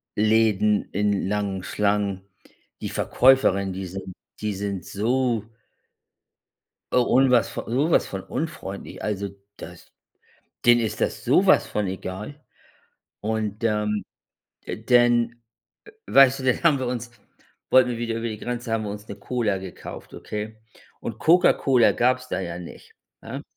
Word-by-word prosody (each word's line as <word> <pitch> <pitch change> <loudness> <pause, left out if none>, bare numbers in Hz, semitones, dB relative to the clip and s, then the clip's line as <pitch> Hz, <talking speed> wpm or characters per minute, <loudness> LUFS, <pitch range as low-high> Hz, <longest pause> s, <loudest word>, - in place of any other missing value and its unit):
Läden 105 -1 +2
in 100 -1 0
langen 100 -2 -2
Schlangen. 100 -2 0 0.6
Die - - -3
Verkäuferinnen, 110 -7 +3
die 95 +1 -5
sind 95 +1 -7 0.3
die 105 -1 -1
sind 100 -2 -4
so 120 +1 0 1.5
un 125 +2 +4
was 125 -2 +3
sowas 140 +8 +1
von 95 -1 -6
unfreundlich. 120 -11 -6
Also, 100 -1 -2 0.3
das 85 +1 -11 0.7
denen 120 0 +6
ist 110 -2 -3
das - - -1
sowas - - +4
von 105 -1 -2
egal. 95 +9 -6 0.8
Und, 110 0 -3
ähm, 105 -2 0 0.6
denn 120 0 +2 0.7
weißt 135 0 +6
du, - - -6
dann 130 -2 +1
haben 160 -5 +4
wir 130 - -2
uns 120 -1 -4 0.6
wollten 130 -1 +5
wir 120 - -3
wieder 115 -1 -2
über 115 +1 -3
die 110 -1 -6
Grenze, 120 0 -4
haben 110 -1 0
wir 105 - -4
uns 105 +1 -8
'ne 100 - -7
Cola 105 -1 -1
gekauft, 95 -1 -9
okay? 110 +1 -6 0.4
Und 115 -1 -6
Coca-Cola 135 -4 +4
gab's 130 +1 +1
da - - -2
ja 85 -2 -5
nicht, 90 - -12 0.3
ne? - - -7
110 Hz, 135 wpm, -24 LUFS, 100-120 Hz, 1.5 s, denen